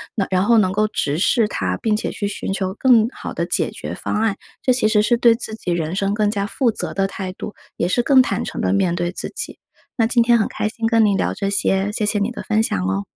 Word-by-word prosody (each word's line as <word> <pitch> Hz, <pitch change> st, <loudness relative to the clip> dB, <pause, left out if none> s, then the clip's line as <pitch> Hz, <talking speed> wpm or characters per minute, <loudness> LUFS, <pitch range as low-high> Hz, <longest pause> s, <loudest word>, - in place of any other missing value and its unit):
能 200 Hz, -, 0 dB
然 185 Hz, +1 st, +2 dB
后 235 Hz, +1 st, +4 dB
能 190 Hz, -4 st, +3 dB
够 215 Hz, +2 st, +1 dB
直 150 Hz, -8 st, -1 dB
视 215 Hz, +4 st, +2 dB
它， 90 Hz, -1 st, -2 dB
并 215 Hz, -1 st, +1 dB
且 -, -, -3 dB
去 205 Hz, -, -3 dB
寻 195 Hz, -, -4 dB
求 190 Hz, -1 st, -2 dB
更 235 Hz, -3 st, +4 dB
好 -, -, -7 dB
的 -, -, -2 dB
解 -, -, 0 dB
决 -, -, -7 dB
方 -, -, -4 dB
案。 220 Hz, -3 st, 0 dB, 0.2 s
这 255 Hz, -, +2 dB
其 245 Hz, -3 st, +2 dB
实 215 Hz, -1 st, +3 dB
是 235 Hz, +3 st, +2 dB
对 235 Hz, -1 st, +5 dB
自 225 Hz, -2 st, -5 dB
己 185 Hz, -5 st, -3 dB
人 165 Hz, -1 st, -2 dB
生 195 Hz, 0 st, 0 dB
更 210 Hz, 0 st, +1 dB
加 200 Hz, -1 st, -1 dB
负 240 Hz, +2 st, +1 dB
责 -, -, -4 dB
的 195 Hz, -1 st, 0 dB
态 190 Hz, -1 st, -6 dB
度， 205 Hz, -, -7 dB, 0.2 s
也 170 Hz, -, -1 dB
是 240 Hz, -, +2 dB
更 260 Hz, +2 st, +5 dB
坦 -, -, -1 dB
诚 -, -, -5 dB
地 -, -, +1 dB
面 190 Hz, -3 st, +1 dB
对 175 Hz, 0 st, -2 dB
自 -, -, -4 dB
己。 470 Hz, -, -3 dB, 0.4 s
那 225 Hz, -2 st, +3 dB
今 235 Hz, 0 st, +3 dB
天 235 Hz, 0 st, +4 dB
很 215 Hz, -, +1 dB
开 -, -, -3 dB
心 225 Hz, +1 st, -2 dB
跟 225 Hz, -1 st, +4 dB
您 200 Hz, -1 st, +2 dB
聊 -, -, 0 dB
这 195 Hz, -, -2 dB
些， 195 Hz, 0 st, +1 dB
谢 210 Hz, 0 st, -1 dB
谢 210 Hz, -, +1 dB
你 205 Hz, +3 st, 0 dB
的 -, -, -7 dB
分 220 Hz, 0 st, +1 dB
享 95 Hz, -, -1 dB
哦。 95 Hz, +1 st, -1 dB
210 Hz, 290 characters per minute, -20 LUFS, 195-225 Hz, 0.4 s, 对